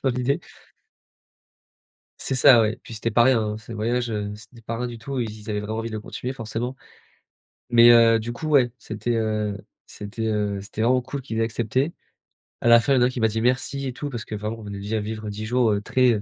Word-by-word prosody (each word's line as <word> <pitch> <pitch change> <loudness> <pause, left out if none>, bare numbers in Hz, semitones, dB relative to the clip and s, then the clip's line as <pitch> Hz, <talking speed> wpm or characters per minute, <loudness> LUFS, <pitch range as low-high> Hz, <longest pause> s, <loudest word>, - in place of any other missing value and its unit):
dans 135 - +3
l'idée. 125 +3 0 1.8
C'est 135 - -1
ça, 130 -3 +7
oui. 110 0 +1
Puis 115 - -10
c'était 115 +2 -2
pas 120 +2 +5
rien, 130 -3 +4
hein, 105 0 -2
ce 110 +1 -12
voyage, 120 +2 -1
heu, 105 -1 -3
c'était 115 +2 -15
pas 115 +1 -4
rien 125 +1 -2
du 120 - -7
tout. 135 +4 -5
Ils 115 - -2
ils 110 0 -10
avaient 105 -1 -1
vraiment 110 +2 -4
envie 115 0 -3
de 110 - -5
le 105 - -5
continuer 125 +4 -5
forcément. 120 +1 -4 0.9
Mais 120 0 +7
heu, 115 -1 +6
du 115 +2 -4
coup, 155 +6 -6
ouais, 130 -5 +4
c'était, 120 - -5
heu, 105 -2 -1 0.3
c'était, 105 +2 -6
heu, 105 -2 -1
c'était 105 +2 -8
vraiment 125 +2 +3
cool 135 +2 -5
qu'ils 115 -4 -5
aient - - +2
accepté. 120 +7 -1 0.7
À - - -1
la 115 0 +8
fin, 140 - +2
il - - +4
y - - +2
a - - +6
un 125 - +2
qui 125 -2 -5
m'a 110 - +4
dit: 110 - -2
«Merci» 130 +2 0
et 125 - -4
tout 145 +3 -5
parce 120 -4 -6
que 110 - -5
vraiment 105 +2 -4
on - - -10
venait 100 -1 -6
de 105 +2 -2
vivre 110 0 -5
10 105 +1 -5
jours, 120 -1 +2
heu, 100 0 0
très, 120 -2 +2
115 Hz, 245 wpm, -24 LUFS, 110-125 Hz, 1.8 s, la